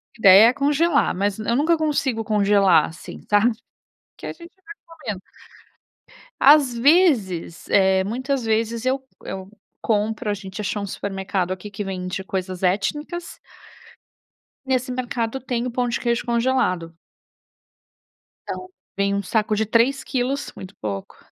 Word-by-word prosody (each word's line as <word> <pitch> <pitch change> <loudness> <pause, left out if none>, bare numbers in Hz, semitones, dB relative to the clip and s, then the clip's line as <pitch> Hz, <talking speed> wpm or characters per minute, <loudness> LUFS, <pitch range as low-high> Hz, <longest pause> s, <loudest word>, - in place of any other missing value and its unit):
A - - -20
ideia 200 +1 +8
é 240 - +3
congelar, 285 +3 +2
mas 200 +1 -1
eu 220 +2 0
nunca 320 +5 +3
consigo 280 -7 0
congelar, 200 -5 +4
assim, 160 - -10
sabe? 210 +3 +4 0.7
Que - - -8
a - - -5
gente 340 0 -14
vai 420 +2 -10
comendo. 300 - -7 1.2
As 275 -4 +6
vezes, 235 - +2
eh, 190 -1 +4
muitas 260 +6 -2
vezes 225 +1 0
eu 260 +1 +1 0.2
eu 190 0 -7 0.3
compro. 215 0 -1
A - - +1
gente 195 +1 -7
achou 205 0 -2
supermercado 195 -2 -3
aqui 190 +2 -6
que 200 +1 -5
vende 185 -1 -4
coisas 185 -1 -4
étnicas. 295 - -2 1.3
Nesse 255 -1 0
mercado 245 -1 -3
tem 245 -2 -3
o - - -4
pão 245 +1 -1
de 235 - -2
queijo 235 -1 -1
congelado. 235 -9 0 1.6
Então 365 - -5 0.3
vem 200 0 +1
um 200 - 0
saco 215 +2 0
de 220 - +1
3 235 +5 +2
quilos, 265 +2 -2
muito 190 +1 -10
pouco 100 -2 -5
220 Hz, 140 wpm, -22 LUFS, 195-260 Hz, 1.6 s, ideia